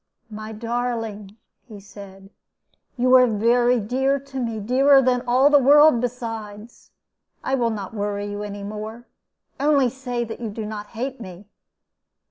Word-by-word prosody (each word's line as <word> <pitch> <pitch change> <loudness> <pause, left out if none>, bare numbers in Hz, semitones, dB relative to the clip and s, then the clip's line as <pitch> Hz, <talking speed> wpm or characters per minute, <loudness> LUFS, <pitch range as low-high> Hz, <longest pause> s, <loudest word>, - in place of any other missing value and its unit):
"My 215 +1 -7
darling," 225 -2 -4 0.3
he 215 -4 -11
said, 195 -1 -13 0.7
"you 255 +1 +2
are 255 -1 +7
very 240 +3 +2
dear 265 +6 0
to 270 0 -8
me 230 -3 -3
dearer 270 +6 +4
than 250 -1 +1
all 260 +4 +4
the 290 - +6
world 290 -1 +6
besides. 225 -3 -7 0.5
I 265 - -2
will 240 -3 +1
not 205 -2 -6
worry 205 -1 -3
you 205 0 -5
any 205 -1 -6
more. 215 +3 -7 0.5
Only 280 -3 +2
say 250 -2 -4
that 225 -1 -7
you 230 -2 -4
do 215 +1 -6
not 210 -1 -7
hate 255 +4 -6
me." 185 -1 -10
230 Hz, 150 wpm, -22 LUFS, 210-255 Hz, 0.7 s, are